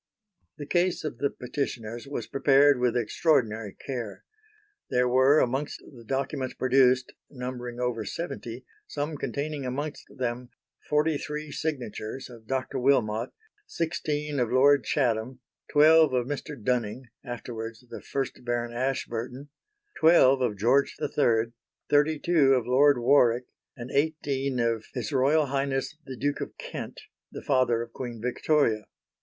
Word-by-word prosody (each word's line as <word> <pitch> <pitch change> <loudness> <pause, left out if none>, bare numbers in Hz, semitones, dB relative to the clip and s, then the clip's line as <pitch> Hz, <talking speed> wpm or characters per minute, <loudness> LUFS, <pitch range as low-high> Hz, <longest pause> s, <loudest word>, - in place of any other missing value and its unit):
The 145 - -6
Case 175 +4 +1
of 155 - -5
the 140 - +1
Petitioners 120 -2 -5
was 140 - -4
prepared 140 0 +4
with 125 -1 +1
extraordinary 115 - +1
care. 120 -6 -5 0.7
There 125 0 +2
were 130 +4 +5
amongst 135 +2 0
the 120 - -12
documents 135 +2 -3
produced, 130 0 +3 0.2
numbering 125 -2 -6
over 125 -3 -1
seventy, 125 - -6 0.2
some 150 +1 -3
containing 140 +2 -3
amongst 145 +4 -4
them 125 -1 -4 0.4
forty 150 0 +2
three 150 0 -5
signatures 130 -5 -4
of 115 -2 -14
Dr. 130 0 -2
Wilmot, 120 -3 +2 0.4
sixteen 150 - -2
of 120 -2 0
Lord 140 +2 +5
Chatham, 125 -2 0 0.3
twelve 155 -1 +6
of 125 -1 +1
Mr. 145 -2 -5
Dunning 120 +1 -1 0.2
(afterwards 115 -2 -7
the - - -8
1st 135 -2 -4
Baron 120 -1 -2
Ashburton), 125 +1 -3 0.5
twelve 140 -5 +6
of 115 -5 0
George 125 +7 +2
III, 115 -5 +1 0.4
thirty 150 +2 +4
two 145 -4 +4
of 125 -3 0
Lord 140 +3 +5
Warwick 120 -1 +4 0.3
and 120 +2 -7
eighteen 140 -3 0
of 115 -2 0
H.R.H., 135 +3 +1
the 130 -1 -7
Duke 145 +4 -1
of - - -6
Kent, - - -7 0.3
the - - -8
father 130 -4 +2
of 115 - -13
Queen 120 -3 -6
Victoria. 125 -2 +1
130 Hz, 130 wpm, -27 LUFS, 120-145 Hz, 0.7 s, twelve